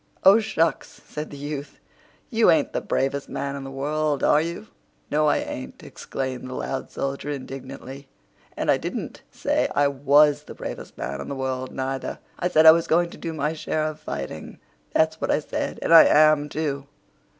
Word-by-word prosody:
"Oh, 200 +3 +8
shucks!" 165 -8 -1
said 150 0 -6
the 145 - -9
youth. 145 0 -6 0.5
"You 225 -3 +4
ain't 160 -4 +3
the - - -1
bravest 135 +1 -1
man 140 0 -3
in 140 - -6
the 135 - -7
world, 145 +2 -1
are 150 - +5
you?" 170 +6 -5 0.5
"No, 150 +1 +3
I - - +3
ain't," 65 0 -6
exclaimed 130 -1 -5
the 130 - -6
loud 135 - -4
soldier 140 +1 -4
indignantly; 135 0 -7 0.5
"and - - +2
I - - +3
didn't - - -5
say - - 0
I 145 0 +4
was 145 +2 +4
the - - -10
bravest - - -7
man 70 +1 -4
in - - -7
the 140 - -3
world, 130 -1 -3
neither. 135 0 -3 0.2
I 180 - +1
said 160 -2 +4
I 160 - +12
was 165 +1 +1
going 170 +1 +2
to - - -11
do 165 - -4
my 155 0 -1
share 155 0 -2
of 155 0 -4
fighting—that's 160 - -4
what - - -1
I - - +3
said. 150 - -4
And - - +2
I 165 - +10
am, 155 -1 +5
too. 140 -3 -3
145 Hz, 185 wpm, -24 LUFS, 135-155 Hz, 0.5 s, I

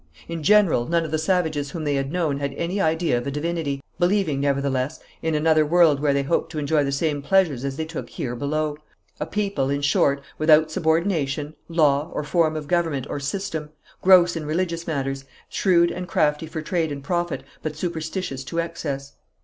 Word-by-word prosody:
In 170 -1 -4
general, 195 - +4
none 170 0 +1
of 155 - -6
the 155 - 0
savages 155 -4 0
whom 160 +2 -5
they 145 -1 0
had 135 0 -1
known 160 -5 0
had 140 -1 -3
any 180 +6 -1
idea 160 -6 +1
of 120 - -6
a - - 0
divinity, 150 -1 -2 0.2
believing, 175 -5 +2
nevertheless, 140 0 0 0.2
in 160 -1 0
another 155 0 +4
world 160 -2 +4
where 145 0 +2
they 140 0 +1
hoped 155 +5 0
to - - -5
enjoy 150 0 +2
the 140 - -1
same 145 +1 0
pleasures 155 -5 +2
as 135 0 -3
they 160 - -2
took 160 0 -6
here 120 -2 -4
below 150 +3 -1 0.4
a 150 - -3
people, 195 -8 -1
in 140 0 -1
short, 140 0 +3 0.2
without 155 0 +5
subordination, 160 -4 0
law 150 -2 +2
or - - -1
form 155 +1 +1
of 150 -2 -5
government 165 -6 0
or - - -2
system, 150 +1 -3 0.3
gross 180 -2 +6
in 165 - -3
religious 170 +1 -2
matters, 135 -3 -2 0.3
shrewd 170 -3 +3
and 180 0 -5
crafty 150 0 +1
for 155 0 -5
trade 165 -1 -1
and 140 -1 -6
profit, 175 +2 -2 0.2
but 155 -1 -4
superstitious 160 -3 -3
to 165 +5 -6
excess. 145 -5 -4
155 Hz, 190 wpm, -23 LUFS, 140-170 Hz, 0.4 s, gross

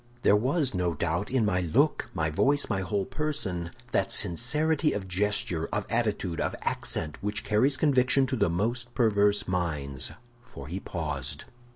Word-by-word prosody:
"There - - +6
was, 130 +5 +1
no 90 -3 0
doubt, 85 +5 -1
in 130 -4 +2
my 90 -3 +1
look, 135 - +1
my 80 -2 0
voice, 145 - +2
my 95 -1 -1
whole 95 +1 -1
person, 95 - -3 0.2
that 95 0 +1
sincerity 150 - +2
of 100 -2 -4
gesture, 90 -3 0
of 105 - -1
attitude, 105 -7 -1
of - - -1
accent, 75 -2 -2
which 105 +1 -2
carries 130 +6 +3
conviction 135 -2 +3
to 130 0 -2
the 110 - +2
most 120 +7 -2
perverse 105 -3 +3
minds, 75 -7 -1 0.3
for 70 - -10
he 90 +5 -4
paused. 75 -8 -3
105 Hz, 160 wpm, -28 LUFS, 85-125 Hz, 0.3 s, There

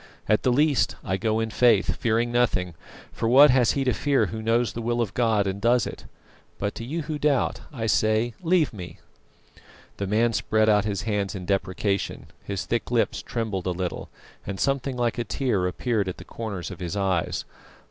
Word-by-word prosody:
At 105 0 +3
the 125 - +2
least 145 +2 +2
I 95 - -1
go 110 +2 0
in 110 0 -2
faith, 115 -3 +3
fearing 115 +1 +1
nothing, 110 -8 +1 0.4
for 115 - -1
what 140 +3 +8
has 125 -3 +3
he 140 - 0
to 130 -2 +1
fear 140 +4 +2
who 110 - -5
knows 115 -1 +1
the 115 - -5
will 120 +1 -1
of 110 -4 -1
God 110 -4 +2
and 95 +1 -3
does 120 +1 +3
it? - - -8 0.5
But 100 +1 -2
to - - -7
you 155 +7 -3
who 150 0 -4
doubt, 145 -4 +1
I 115 -6 -4
say 110 +2 +2
leave 170 -5 +2
me!" 90 -4 -8 1.0
The 100 - -3
man 115 +3 +2
spread 110 0 +1
out 105 -1 +3
his 100 -3 -2
hands 105 -3 -1
in 90 -2 -6
deprecation; 95 +1 -1 0.2
his 100 -2 -4
thick 115 - -2
lips 120 -1 +1
trembled 105 -6 -3
a 90 -1 -2
little, 90 -1 -4 0.3
and 95 0 -5
something 135 -1 0
like 120 -1 0
a - - 0
tear 110 -5 0
appeared 105 +1 -1
at 90 - -6
the - - -11
corners 100 -6 -5
of 90 - -9
his 90 +2 -4
eyes. 95 -4 -1
110 Hz, 200 wpm, -25 LUFS, 100-120 Hz, 1.0 s, what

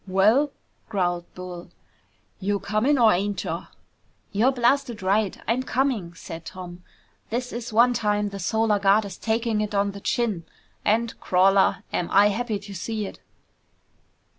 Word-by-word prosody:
"Well?" 215 +10 +4 0.4
growled 175 -4 -1
Bull. 180 -1 -8 0.7
"You 200 +1 0
coming 215 +9 +1
or 230 -3 +6
ain't 200 +3 -1
cha?" - - -4 0.6
"You're 225 +7 +3
blasted 245 -3 +1
right 200 +1 +1
I'm 235 +3 +1
coming," 250 -10 -1
said 165 0 -8
Tom. 180 0 -9 0.5
"This 245 +2 -3
is 235 0 -5
one 240 +3 +5
time 210 -2 0
the 200 0 -7
Solar 220 +2 +1
Guard 200 +2 +4
is 195 -3 -7
taking 225 -1 0
it 210 -1 -3
on 200 0 +2
the 200 0 -10
chin. 210 -9 -1 0.4
And, 225 +2 +1
crawler, 190 +1 +3
am 175 - -1
I 200 +1 +5
happy 220 +1 -1
to 200 0 -10
see 215 +3 -3
it!" - - -9
205 Hz, 150 wpm, -25 LUFS, 195-230 Hz, 0.7 s, or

